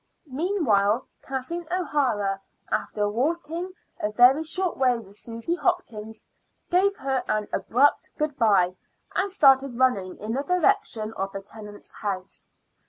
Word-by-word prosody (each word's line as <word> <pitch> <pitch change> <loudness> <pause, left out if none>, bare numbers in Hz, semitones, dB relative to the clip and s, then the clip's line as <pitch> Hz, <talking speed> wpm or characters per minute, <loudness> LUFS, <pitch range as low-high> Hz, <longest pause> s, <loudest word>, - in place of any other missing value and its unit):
Meanwhile 260 - +1 0.2
Kathleen 275 +6 -4
O'Hara, 260 - 0 0.3
after 210 -1 0
walking 325 - -2 0.3
a 210 - -1
very 250 +6 +6
short 360 +3 -1
way 255 -2 +3
with 200 -3 -11
Susy 230 +8 -4
Hopkins, 225 - -2 0.5
gave 390 +3 +3
her 265 -5 -1
an 215 -1 0
abrupt 275 +5 +2
good 300 -2 -1
bye 195 -6 +4 0.4
and 395 +2 0
started 270 -7 +4
running 205 -8 +1
in 215 +2 -4
the 270 - 0
direction 355 - +1
of 195 -2 -3
the 195 - -4
Tennants' 210 0 -11
house. 195 -3 -5
255 Hz, 130 wpm, -25 LUFS, 210-320 Hz, 0.5 s, very